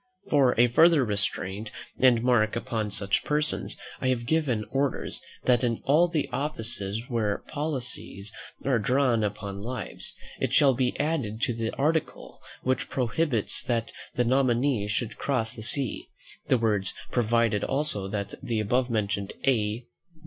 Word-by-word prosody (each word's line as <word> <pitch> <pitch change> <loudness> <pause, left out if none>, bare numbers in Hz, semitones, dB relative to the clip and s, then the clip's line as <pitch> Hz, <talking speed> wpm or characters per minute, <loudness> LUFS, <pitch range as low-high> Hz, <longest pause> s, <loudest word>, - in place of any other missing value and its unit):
For 140 -4 +4
a 120 - +8
further 150 +3 +5
restraint 100 0 -1 0.3
and 125 -3 +5
mark 115 -4 +3
upon 115 -3 -2
such 100 -1 +1
persons, 150 +1 0 0.2
I - - -1
have 125 -2 0
given 130 -8 +1
orders, 135 0 0 0.2
that 125 0 +3
in 115 -2 +1
all 155 +6 +4
the 155 -5 -1
offices 115 -6 -3
where 110 -4 -1
policies 125 -9 -3 0.3
are 130 -4 +3
drawn 125 0 +2
upon 100 -1 -4
lives, 115 -2 -5 0.2
it - - -1
shall 140 -2 +6
be 125 0 -1
added 140 -9 -1
to 125 - +2
the 115 0 -2
article 155 +3 -1 0.2
which 130 0 0
prohibits 125 -2 0
that 115 -2 -1 0.2
the 125 - +2
nominee 125 -3 +2
should 105 +2 -2
cross 115 -5 0
the - - -9
sea, 125 +2 -2 0.4
the 130 - +4
words, 105 -5 +1 0.2
"Provided 115 -3 +2
also, 135 -9 0
that 100 0 -4
the 115 -2 -1
above 125 +4 +1
mentioned 100 -3 -1
A. 115 -3 +1
120 Hz, 145 wpm, -27 LUFS, 110-135 Hz, 0.4 s, a